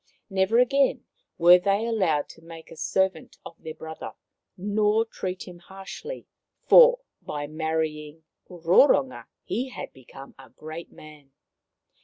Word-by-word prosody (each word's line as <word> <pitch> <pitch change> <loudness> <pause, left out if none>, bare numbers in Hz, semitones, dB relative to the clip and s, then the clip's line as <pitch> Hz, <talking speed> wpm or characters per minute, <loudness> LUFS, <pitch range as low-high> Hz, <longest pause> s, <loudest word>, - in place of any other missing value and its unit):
Never 190 +4 +2
again 270 +3 +2 0.3
were 175 +1 +7
they 200 +4 0
allowed 185 -11 0
to - - -14
make 165 0 -13
a - - -10
servant 190 +3 -1
of - - -9
their 160 -1 -8
brother, 160 0 -8 0.4
nor 210 +3 +1
treat 185 -4 -6
him 175 -1 -11
harshly, 195 - -9 0.4
for - - +7 0.2
by 145 -1 -5
marrying 155 0 -4 0.3
Roronga 165 - +3 0.2
he 250 +5 -3
had - - -8
become 135 +1 -14
a 135 - -14
great 155 +2 -10
man. 150 -3 -16
175 Hz, 130 wpm, -25 LUFS, 155-210 Hz, 0.4 s, were